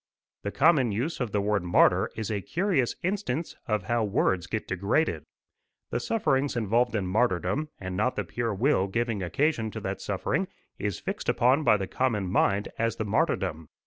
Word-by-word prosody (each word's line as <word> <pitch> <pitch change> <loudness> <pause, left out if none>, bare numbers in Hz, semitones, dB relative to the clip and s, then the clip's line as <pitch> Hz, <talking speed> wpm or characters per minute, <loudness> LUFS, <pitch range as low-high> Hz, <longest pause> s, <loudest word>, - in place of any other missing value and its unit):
The 100 - -3
common 135 -1 +4
use 125 +11 -2
of 125 -5 -2
the 105 - +1
word 105 0 +1
martyr 90 - +4
is 110 -1 -3
a 105 -2 -1
curious 170 - 0
instance 175 -5 -2
of 105 -2 0
how 120 0 0
words 95 -3 +1
get 110 +4 -3
degraded. 100 - 0 0.7
The - - 0
sufferings 145 - 0
involved 120 +1 +1
in 100 -3 0
martyrdom, 105 - 0
and 95 -1 -5
not 115 +7 +1
the - - -1
pure 120 -1 -2
will 105 -3 +2
giving 115 0 -1
occasion 110 - 0
to - - -6
that - - -4
suffering, - - -1 0.3
is 105 -3 -2
fixed - - -4
upon 130 +6 +3
by 105 - +5
the 95 - -3
common 115 -3 0
mind 100 +1 +2
as 115 0 +1
the 110 - -3
martyrdom. 100 - 0
110 Hz, 175 wpm, -27 LUFS, 100-130 Hz, 0.7 s, by